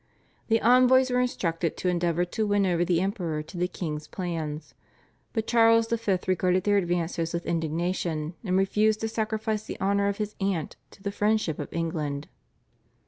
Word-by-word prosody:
The 225 0 +3
envoys 255 +2 +5
were 250 - +2
instructed 170 -9 -1
to - - -2
endeavour 175 -1 +1
to 215 +5 -2
win 205 -1 +2
over 175 -2 +2
the 175 -1 +1
Emperor 175 -6 -2
to 160 - -13
the 180 +1 0
king's 155 -4 -5
plans, 160 -5 -4 0.6
but 220 -2 -2
Charles 230 -1 +4
V. 225 -5 +1
regarded 185 0 +2
their 205 -1 +3
advances 170 -2 -1
with 170 0 -3
indignation 165 -1 -1
and 185 -3 +1
refused 210 +3 +2
to 225 - 0
sacrifice 220 -1 -2
the - - -7
honour 200 +1 +2
of 200 0 -1
his 210 -1 -3
aunt 195 -5 -1
to 195 - -18
the 200 - -2
friendship 210 -6 0
of - - -5
England. 155 -4 -3
185 Hz, 170 wpm, -27 LUFS, 170-215 Hz, 0.6 s, envoys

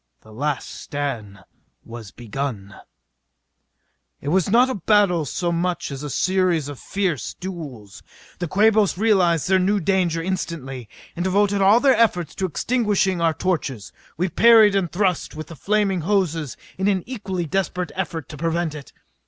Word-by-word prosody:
The 110 - -16
last 145 +4 -2
stand 120 -9 -5 0.4
was 115 -3 -9
begun. 110 -2 -5 1.5
It 140 - -4
was 185 +2 +2
not 240 +5 +5
a 260 - -2
battle 195 -5 +2
so 175 +5 -2
much 175 -1 -2
as 135 -1 -6
a 150 - -5
series 180 -2 +1
of 145 -3 -8
fierce 185 - -2
duels. 150 - -8 0.4
The 175 - -2
Quabos 210 +1 +3
realized 185 -7 +2
their 190 0 +4
new 200 +3 +2
danger 180 -2 +1
instantly, 160 - -4 0.3
and 175 - -2
devoted 200 +1 +2
all 200 +4 +6
their 270 0 +4
efforts 185 -8 +1
to 190 - -2
extinguishing 200 - 0
our 165 -1 +2
torches. 145 - -2 0.2
We 180 +3 +1
parried 220 +3 +6
and 185 -4 0
thrust 180 -4 -1
with 155 0 -6
the 165 - -9
flaming 200 +1 0
hoses 165 - -1 0.2
in 190 - +1
an 190 -3 +1
equally 195 -8 -4
desperate 180 +1 -2
effort 165 -5 -4
to 150 - -8
prevent 165 0 -1
it. 150 -2 -10
175 Hz, 155 wpm, -22 LUFS, 150-195 Hz, 1.5 s, all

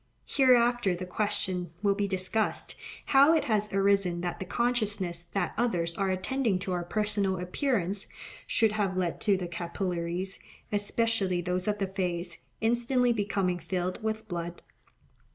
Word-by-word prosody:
Hereafter 240 -6 +4
the 180 +1 -5
question 185 -3 -1
will 200 -1 +4
be 200 0 -1
discussed, 190 +3 -1 0.4
how 280 +4 +7
it 315 - +2
has 210 -2 0
arisen 195 -3 +2
that 175 -1 -3
the 190 - -5
consciousness 205 -8 0
that 175 +1 -2
others 175 -8 +1
are 195 -1 0
attending 200 +3 0
to 190 - -3
our 175 -1 -1
personal 205 0 0
appearance 195 +1 -1 0.4
should 225 -2 +3
have 200 -3 -1
led 175 -2 -1
to 200 -3 +3
the 180 -1 -4
capillaries, 175 +1 -3 0.3
especially 205 -2 +1
those 180 +2 -2
of 210 0 +1
the 200 - 0
face, 180 -3 -3 0.2
instantly 240 +2 +2
becoming 195 -4 0
filled 180 0 -3
with 220 0 -3
blood. 175 -2 -5
195 Hz, 145 wpm, -29 LUFS, 180-220 Hz, 0.4 s, how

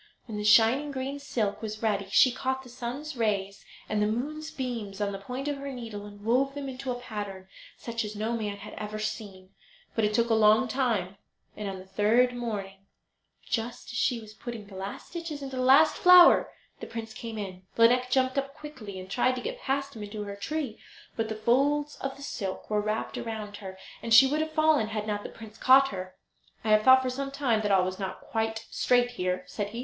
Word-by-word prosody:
When 220 - -7
the - - -3
shining 230 +7 +5
green 275 +1 -4
silk 225 -8 -2
was 215 0 -6
ready 200 -3 0
she 255 +6 +6
caught 260 +1 -2
the 255 - -13
sun's 255 +5 -5
rays 200 -4 -1 0.2
and 215 -1 0
the 210 - +3
moon's 300 +8 -3
beams 235 -9 -5
on 205 -1 0
the 195 - -5
point 250 +7 -5
of 290 -1 -1
her 275 0 -6
needle 225 -5 -7
and 205 0 -13
wove 270 +4 +2
them 285 -1 -4
into 265 0 -6
a 245 - -4
pattern 205 -5 -6 0.3
such 230 0 -3
as 210 0 -6
no 220 +3 -1
man 210 -3 -3
had 200 - -10
ever 215 0 -5
seen. 200 -3 -6 0.4
But 225 - 0
it 210 0 +1
took 235 0 +2
a - - +5
long 220 +3 +5
time, 220 -7 -1 0.4
and 210 -2 -4
on 190 - -5
the 185 - -11
third 225 +6 +3
morning, 200 -5 -5 0.6
just 235 +1 -3
as 245 - -4
she 250 -1 +1
was 215 -1 -12
putting 225 0 -7
the 200 - -15
last 195 +1 -6
stitches 330 -4 -6
into 270 -1 -6
the - - 0
last 275 +5 +6
flower 360 -1 +8 0.3
the - - -7
prince 225 -1 -6
came 230 -1 -7
in. 185 -3 -7
Lineik 250 +2 +5
jumped 260 +1 +2
up 275 +1 -5
quickly, 250 -11 -8
and 185 - -8
tried 250 +6 +1
to 250 - -4
get - - -5
past 275 0 -2
him 220 - -8
back 205 0 -7
to 210 -1 -4
her 200 -1 -6
tree; 270 +2 -4 0.4
but 225 -1 -2
the 220 - -3
folds 280 +7 +1
of 270 0 -4
the 280 - -10
silk 195 -7 -5
were 210 0 +2
wrapped 215 +1 -2
round 215 -3 -5
her, 190 -2 -9 0.2
and 230 -1 +3
she 255 +4 +10
would 295 +3 +1
have 315 0 -3
fallen 310 -7 +3
had 215 -1 -3
not 205 -1 -2
the - - -7
prince 220 -1 -12
caught 270 +1 +6
her. 185 -1 -7 0.5
"I 220 - -2
have 215 0 +6
thought 260 +3 +7
for 255 - -1
some 275 +2 -3
time 265 -6 +1
that 205 -1 0
all 190 -2 +4
was 185 +1 -4
not 190 -1 -5
quite 225 0 -2
straight 245 -1 +2
here," 180 -5 -2
said 205 -1 -4
he. 230 +3 -7
225 Hz, 225 wpm, -28 LUFS, 210-260 Hz, 0.6 s, she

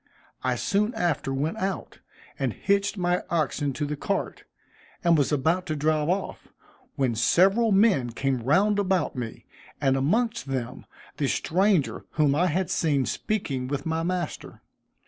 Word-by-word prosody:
I - - +1
soon 210 +3 0
after 170 -6 -1
went 140 +4 -1
out, 190 0 -4 0.4
and - - 0
hitched 200 +1 0
my 180 0 +1
oxen 150 -3 0
to 150 +3 -2
the 150 +1 -3
cart, - - -3 0.6
and 170 -1 +5
was 145 -2 +2
about 160 +6 +1
to 155 - -1
drive 155 +1 +1
off, 190 +2 -2 0.5
when 130 -3 +1
several 195 - +3
men 195 - +4
came 130 +1 -1
round 195 - +3
about 190 -6 0
me, 120 -3 -6 0.3
and 135 -2 +2
amongst 215 - 0
them 130 -1 -4 0.3
the 145 - 0
stranger 185 +1 +1
whom 150 -3 +3
I 175 +5 +2
had 180 +3 -1
seen 145 -5 +1
speaking 135 - -2
with 140 0 -3
my 160 0 -1
master. 175 -1 -4
160 Hz, 150 wpm, -26 LUFS, 140-190 Hz, 0.6 s, and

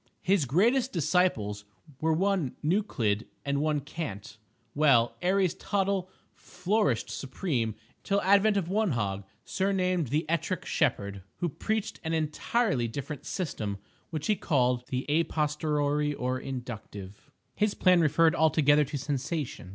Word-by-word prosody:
His 190 -5 +3
greatest 235 - +2
disciples 140 - +1 0.4
were 160 +1 +1
one 180 -4 +1
Neuclid, 140 - 0 0.2
and 140 0 0
one 150 -1 +1
Cant. 140 - -6 0.4
Well, 135 -6 +4
Aries 185 -1 +2
Tottle 195 -2 -1 0.2
flourished 185 - -1
supreme 130 - -2 0.2
until 200 0 0
advent 200 +2 +4
of 185 -4 -1
one 200 -2 +1
Hog, 100 -4 -2 0.2
surnamed 185 -4 0
the 150 +6 0
"Ettrick 170 +1 -1
Shepherd," 100 -1 0
who 175 - -2
preached 220 +7 -3
an 160 0 -2
entirely 155 - 0
different 140 +5 -6
system, 110 - -3 0.3
which 155 -2 -4
he 215 - +2
called 125 -8 +1
the 130 0 -2
a 160 +3 +2
posteriori 150 -1 0
or 130 0 -2
inductive. 110 -7 -8 0.2
His 210 -1 0
plan 180 -2 +4
referred 160 +1 +4
altogether 150 -2 +4
to 145 +1 -4
Sensation. 140 - -3
155 Hz, 130 wpm, -28 LUFS, 130-185 Hz, 0.4 s, Well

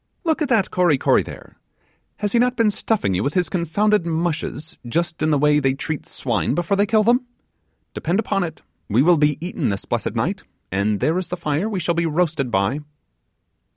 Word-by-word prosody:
Look 320 -2 0
at 295 - 0
that 225 -6 +2
Kory 175 -6 +3
Kory - - +3
there! - - -11 0.6
has 205 -1 -2
he 235 - +3
not 250 +1 +2
been 225 -3 +3
stuffing 205 - 0
you 90 - 0
with 140 - -2
his 180 -2 +1
confounded 195 +4 +1
mushes, 165 -1 -2
just 165 +5 -2
in 155 - +2
the 150 - +3
way 150 +1 +4
they 135 -2 +1
treat 155 +2 -4
swine 120 +1 -1
before 175 +4 0
they 200 +1 +2
kill 215 0 +3
them? 245 +3 +2 0.7
Depend 170 +4 -1
upon 200 -3 0
it, 160 -3 -6 0.3
we 115 +6 +4
will 175 +1 +5
be 150 -1 +3
eaten 175 +3 -2
this 100 -1 -3
blessed - - -2
night, - - -1 0.3
and 100 +2 0
there 165 +4 +2
is 185 - -4
the 180 - -4
fire 165 +5 -1
we 200 -4 -2
shall 170 0 0
be 170 0 0
roasted 155 -4 0
by. 100 +6 +1
170 Hz, 205 wpm, -21 LUFS, 145-200 Hz, 0.7 s, will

